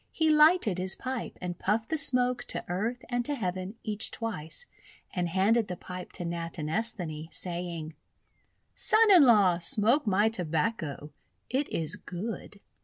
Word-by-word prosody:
He 320 Hz, -1 st, +2 dB
lighted 300 Hz, -, +5 dB
his 185 Hz, +1 st, +1 dB
pipe 255 Hz, -2 st, -5 dB
and 180 Hz, -1 st, -5 dB
puffed 220 Hz, +3 st, 0 dB
the 320 Hz, -, 0 dB
smoke 250 Hz, -3 st, +1 dB
to -, -, -3 dB
Earth 225 Hz, +8 st, -3 dB
and 245 Hz, -1 st, 0 dB
to 290 Hz, +3 st, -1 dB
Heaven 185 Hz, -2 st, -4 dB
each 210 Hz, -1 st, 0 dB
twice, 225 Hz, -, -5 dB, 0.5 s
and 175 Hz, -2 st, -1 dB
handed 205 Hz, +5 st, +2 dB
the 180 Hz, -, -5 dB
pipe 180 Hz, +1 st, -8 dB
to 175 Hz, -, -5 dB
Natinesthani, 165 Hz, 0 st, -4 dB
saying: 170 Hz, -2 st, -4 dB, 0.3 s
— -, -, -42 dB
:< -, -, -46 dB
Son 440 Hz, -1 st, +5 dB
in 355 Hz, -6 st, +9 dB
law, 200 Hz, -8 st, +5 dB
smoke 225 Hz, -, +3 dB
my 205 Hz, +2 st, +3 dB
Tobacco. 160 Hz, -5 st, -2 dB, 0.4 s
It 270 Hz, +3 st, 0 dB
is 165 Hz, +4 st, -2 dB
good." 205 Hz, +2 st, -7 dB
200 Hz, 155 wpm, -29 LUFS, 175-240 Hz, 0.5 s, in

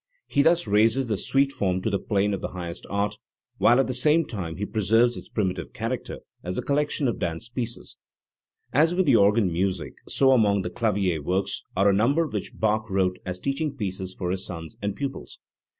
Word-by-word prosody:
He 140 Hz, -, +2 dB
thus 170 Hz, +2 st, +3 dB
raises 110 Hz, +5 st, +3 dB
the 105 Hz, -, +1 dB
suite 135 Hz, +7 st, +1 dB
form 95 Hz, -6 st, -1 dB
to 110 Hz, -, 0 dB
the 100 Hz, -, 0 dB
plane 105 Hz, -1 st, 0 dB
of 100 Hz, -, -3 dB
the -, -, -2 dB
highest 85 Hz, -1 st, -6 dB
art, 100 Hz, +1 st, -1 dB, 0.4 s
while 120 Hz, +2 st, +5 dB
at 135 Hz, -, +4 dB
the 130 Hz, -, -3 dB
same 150 Hz, +6 st, +3 dB
time 85 Hz, -7 st, -5 dB
he 105 Hz, -, -3 dB
pre 110 Hz, +1 st, -2 dB
serves 115 Hz, +4 st, +4 dB
its -, -, -9 dB
primitive 95 Hz, -5 st, -2 dB
character 115 Hz, +2 st, -4 dB, 0.2 s
as 90 Hz, +1 st, -4 dB
a -, -, -2 dB
collection 145 Hz, 0 st, 0 dB
of 120 Hz, -, -2 dB
dance 85 Hz, +7 st, -3 dB
pieces. 120 Hz, -1 st, -5 dB, 0.8 s
As 160 Hz, +6 st, +4 dB
with 185 Hz, 0 st, +2 dB
the 135 Hz, -, +5 dB
organ 100 Hz, -3 st, +4 dB
music, 95 Hz, +2 st, -1 dB
so 135 Hz, -1 st, +3 dB
among 105 Hz, -6 st, +3 dB
the 90 Hz, -, -4 dB
clavier 100 Hz, -8 st, 0 dB
works 90 Hz, +6 st, -1 dB
are 95 Hz, +2 st, +3 dB
a 100 Hz, -, +5 dB
number 140 Hz, +11 st, +3 dB
which 105 Hz, -10 st, -5 dB
Bach 110 Hz, 0 st, 0 dB
wrote 95 Hz, -1 st, 0 dB
as 90 Hz, 0 st, -4 dB
teaching 140 Hz, -, -2 dB
pieces 95 Hz, -2 st, -4 dB
for 90 Hz, -1 st, -2 dB
his 95 Hz, 0 st, -2 dB
sons 80 Hz, -3 st, -7 dB
and 100 Hz, -1 st, -2 dB
pupils. 140 Hz, -1 st, -5 dB
105 Hz, 205 wpm, -25 LUFS, 95-130 Hz, 0.8 s, while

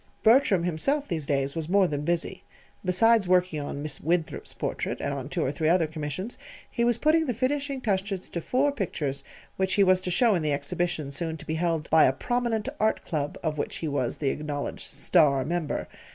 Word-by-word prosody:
Bertram 220 Hz, -6 st, +5 dB
himself, 275 Hz, -, 0 dB
these 160 Hz, -5 st, -3 dB
days, 140 Hz, -1 st, 0 dB
was 165 Hz, -1 st, -3 dB
more 195 Hz, +1 st, +5 dB
than 145 Hz, -3 st, -3 dB
busy. 170 Hz, +1 st, -2 dB, 0.4 s
Besides 200 Hz, +3 st, +4 dB
working 180 Hz, -3 st, +2 dB
on 145 Hz, 0 st, -5 dB
Miss 150 Hz, -2 st, -4 dB
Winthrop's 165 Hz, 0 st, -1 dB
portrait, -, -, -3 dB
and -, -, -2 dB
on -, -, -5 dB
two -, -, -1 dB
or 130 Hz, -, 0 dB
three 155 Hz, +2 st, 0 dB
other 170 Hz, -1 st, +4 dB
commissions, 155 Hz, -, -5 dB, 0.3 s
he 235 Hz, -, 0 dB
was 240 Hz, -1 st, +3 dB
putting 315 Hz, +3 st, +3 dB
the 245 Hz, -, -1 dB
finishing 275 Hz, +3 st, -1 dB
touches 195 Hz, -3 st, -1 dB
to 170 Hz, -, -3 dB
four 270 Hz, -, +1 dB
pictures 150 Hz, -, -3 dB, 0.3 s
which 190 Hz, 0 st, +1 dB
he 200 Hz, -, +5 dB
was 185 Hz, -1 st, +4 dB
to 185 Hz, -, -3 dB
show 225 Hz, +5 st, +4 dB
in 175 Hz, -, +1 dB
the 150 Hz, -1 st, 0 dB
exhibition 145 Hz, +1 st, -2 dB
soon 160 Hz, +2 st, -3 dB
to -, -, -12 dB
be 160 Hz, -, -3 dB
held 165 Hz, -2 st, -1 dB
by 160 Hz, 0 st, +7 dB
a 130 Hz, -, +3 dB
prominent 240 Hz, -, -1 dB
Art 220 Hz, 0 st, +1 dB
Club 145 Hz, -3 st, -2 dB
of 155 Hz, -2 st, -1 dB
which -, -, -3 dB
he 160 Hz, -, -3 dB
was 140 Hz, -5 st, -1 dB
the 140 Hz, -, 0 dB
acknowledged 145 Hz, 0 st, -4 dB
"star" 140 Hz, -7 st, +3 dB
member. 165 Hz, -1 st, -2 dB
175 Hz, 205 wpm, -27 LUFS, 150-210 Hz, 0.4 s, by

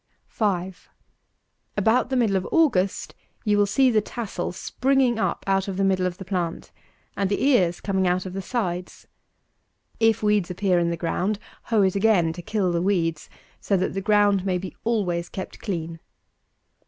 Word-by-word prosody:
5. 190 Hz, -4 st, -2 dB, 0.9 s
About 225 Hz, +5 st, +2 dB
the 265 Hz, -, -1 dB
middle 225 Hz, -6 st, +2 dB
of 190 Hz, -1 st, -1 dB
August 225 Hz, -, +2 dB, 0.3 s
you 210 Hz, -1 st, +3 dB
will 205 Hz, 0 st, +3 dB
see 260 Hz, +5 st, +3 dB
the 215 Hz, -2 st, +3 dB
tassel 205 Hz, -4 st, -4 dB
springing 255 Hz, +5 st, +1 dB
up -, -, -1 dB
out 195 Hz, 0 st, +1 dB
of 190 Hz, -2 st, -4 dB
the 195 Hz, -, +1 dB
middle 190 Hz, -1 st, +2 dB
of 180 Hz, -1 st, -5 dB
the 190 Hz, -, -8 dB
plant, 175 Hz, -3 st, -3 dB, 0.4 s
and 195 Hz, -1 st, 0 dB
the 205 Hz, -, 0 dB
ears 185 Hz, -11 st, +3 dB
coming 190 Hz, -2 st, 0 dB
out 180 Hz, +1 st, 0 dB
of 185 Hz, -, -6 dB
the 195 Hz, -, -3 dB
sides. 185 Hz, -5 st, -4 dB, 0.9 s
If 225 Hz, -1 st, +3 dB
weeds 210 Hz, -4 st, +2 dB
appear 180 Hz, 0 st, +1 dB
in 170 Hz, 0 st, +1 dB
the 170 Hz, -, -2 dB
ground, 180 Hz, +5 st, -1 dB, 0.3 s
hoe 220 Hz, -3 st, +2 dB
it 190 Hz, 0 st, +1 dB
again 195 Hz, -6 st, +3 dB
to 175 Hz, -, -8 dB
kill 190 Hz, 0 st, 0 dB
the 170 Hz, 0 st, 0 dB
weeds, 170 Hz, -5 st, 0 dB, 0.3 s
so 200 Hz, -, +1 dB
that 185 Hz, -, -1 dB
the 195 Hz, -, -2 dB
ground 205 Hz, -1 st, +3 dB
may 185 Hz, -2 st, 0 dB
be 185 Hz, 0 st, -7 dB
always 180 Hz, -7 st, -1 dB
kept 190 Hz, -, -7 dB
clean. 165 Hz, -5 st, -4 dB
195 Hz, 180 wpm, -24 LUFS, 180-215 Hz, 0.9 s, you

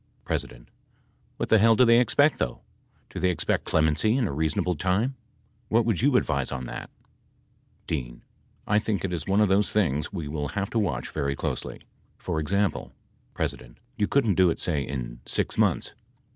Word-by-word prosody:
P. -, -, +1 dB, 1.0 s
What -, -, -3 dB
the 110 Hz, -, +6 dB
hell 115 Hz, +2 st, +5 dB
do 125 Hz, -, +5 dB
they 115 Hz, 0 st, +6 dB
expect 145 Hz, +5 st, +3 dB
though? 60 Hz, -, -2 dB, 0.5 s
Do -, -, -5 dB
they 90 Hz, -, +2 dB
expect 90 Hz, -, -1 dB
clemency 80 Hz, -, +2 dB
in 125 Hz, -5 st, +1 dB
a -, -, -3 dB
reasonable 80 Hz, +4 st, 0 dB
time? 95 Hz, -, 0 dB, 0.5 s
What 115 Hz, +1 st, +2 dB
would 110 Hz, -5 st, 0 dB
you 140 Hz, +1 st, +3 dB
advise 70 Hz, -, 0 dB
on 65 Hz, -1 st, -4 dB
that? -, -, -7 dB, 1.0 s
D. -, -, -4 dB, 0.4 s
I 105 Hz, 0 st, +3 dB
think 105 Hz, -3 st, -2 dB
it 90 Hz, -, -3 dB
is 85 Hz, -, -3 dB
one 100 Hz, +2 st, +3 dB
of 105 Hz, -, +3 dB
those 100 Hz, +2 st, +2 dB
things 75 Hz, -9 st, 0 dB
we 85 Hz, -7 st, -5 dB
will 75 Hz, 0 st, -3 dB
have 100 Hz, -1 st, -2 dB
to 115 Hz, -, +1 dB
watch 85 Hz, -, -2 dB
very 70 Hz, 0 st, -1 dB
closely. -, -, -4 dB, 0.4 s
For 80 Hz, -, -3 dB
example, 100 Hz, +6 st, -1 dB, 0.4 s
P. -, -, +2 dB, 0.5 s
You 105 Hz, -3 st, 0 dB
couldn't 115 Hz, -8 st, +2 dB
do 95 Hz, 0 st, +4 dB
it, -, -, -2 dB
say, 75 Hz, -5 st, 0 dB
in -, -, -5 dB
six -, -, -1 dB
months. -, -, +1 dB
95 Hz, 180 wpm, -26 LUFS, 75-110 Hz, 1.0 s, the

